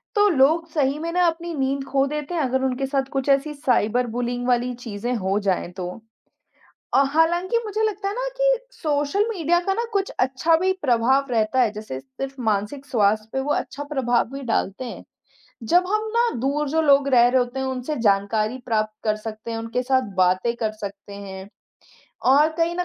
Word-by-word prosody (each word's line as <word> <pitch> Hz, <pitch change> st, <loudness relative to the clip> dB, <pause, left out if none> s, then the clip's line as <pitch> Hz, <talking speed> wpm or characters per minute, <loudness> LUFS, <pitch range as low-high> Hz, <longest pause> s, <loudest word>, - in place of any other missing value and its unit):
तो 415 Hz, 0 st, +5 dB
लोग 320 Hz, +1 st, +3 dB
सही 285 Hz, -3 st, 0 dB
में 335 Hz, +1 st, -3 dB
ना 360 Hz, 0 st, +3 dB
अपनी 335 Hz, +1 st, -2 dB
नींद 270 Hz, 0 st, -1 dB
खो 270 Hz, 0 st, +2 dB
देते 300 Hz, +3 st, -4 dB
हैं, 325 Hz, -, +1 dB
अगर 260 Hz, 0 st, 0 dB
उनके 260 Hz, +1 st, -1 dB
साथ 270 Hz, 0 st, 0 dB
कुछ 270 Hz, 0 st, -1 dB
ऐसी 275 Hz, +2 st, +2 dB
साइबर 250 Hz, -4 st, +1 dB
बुलिंग 245 Hz, 0 st, -2 dB
वाली 245 Hz, 0 st, +1 dB
चीज़ें 225 Hz, +2 st, -3 dB
हो 195 Hz, -2 st, 0 dB
जाएँ 180 Hz, -2 st, 0 dB
तो। 180 Hz, -1 st, -3 dB, 1.1 s
अ, 275 Hz, -, +6 dB
हालाँकि 345 Hz, +7 st, +2 dB
मुझे 430 Hz, 0 st, -2 dB
लगता 415 Hz, -2 st, -1 dB
है 400 Hz, -, -3 dB
ना -, -, -2 dB
कि -, -, +3 dB, 0.2 s
सोशल 300 Hz, +7 st, 0 dB
मीडिया 345 Hz, -5 st, +1 dB
का 385 Hz, +2 st, -1 dB
ना 465 Hz, -, -1 dB
कुछ 395 Hz, -1 st, 0 dB
अच्छा 265 Hz, +6 st, +2 dB
भी 370 Hz, +3 st, +1 dB
प्रभाव 260 Hz, +1 st, +3 dB
रहता 225 Hz, +2 st, +1 dB
है, 240 Hz, -4 st, +3 dB
जैसे 210 Hz, -11 st, -6 dB
सिर्फ़ 265 Hz, -, -8 dB
मानसिक 220 Hz, +6 st, -1 dB
स्वास्थ्य 215 Hz, -3 st, +1 dB
पे 265 Hz, -, -1 dB
वो 290 Hz, +2 st, 0 dB
अच्छा 290 Hz, -, -4 dB
प्रभाव 245 Hz, -4 st, +2 dB
भी 275 Hz, 0 st, -6 dB
डालते 195 Hz, +7 st, -2 dB
हैं। 240 Hz, -, -8 dB, 0.7 s
जब 355 Hz, +1 st, +6 dB
हम 430 Hz, +2 st, 0 dB
ना, 475 Hz, 0 st, +3 dB
दूर 285 Hz, +4 st, 0 dB
जो 320 Hz, +3 st, +2 dB
लोग 280 Hz, -2 st, +4 dB
रह 240 Hz, -2 st, +6 dB
रहे 255 Hz, +1 st, +3 dB
होते 245 Hz, +1 st, -2 dB
हैं, 265 Hz, -, -1 dB
उनसे 260 Hz, +3 st, -3 dB
जानकारी 215 Hz, +4 st, +1 dB
प्राप्त 215 Hz, -2 st, 0 dB
कर 215 Hz, -1 st, +1 dB
सकते 215 Hz, +1 st, -7 dB
हैं, 225 Hz, -, -3 dB
उनके 230 Hz, +2 st, -2 dB
साथ 260 Hz, -5 st, 0 dB
बातें 185 Hz, +6 st, +2 dB
कर 220 Hz, -2 st, -1 dB
सकते 200 Hz, -1 st, -8 dB
हैं, 195 Hz, -1 st, -8 dB, 0.8 s
और 285 Hz, +4 st, +5 dB
कहीं 335 Hz, +1 st, +1 dB
न 360 Hz, -, 0 dB
265 Hz, 195 wpm, -23 LUFS, 225-320 Hz, 1.1 s, अ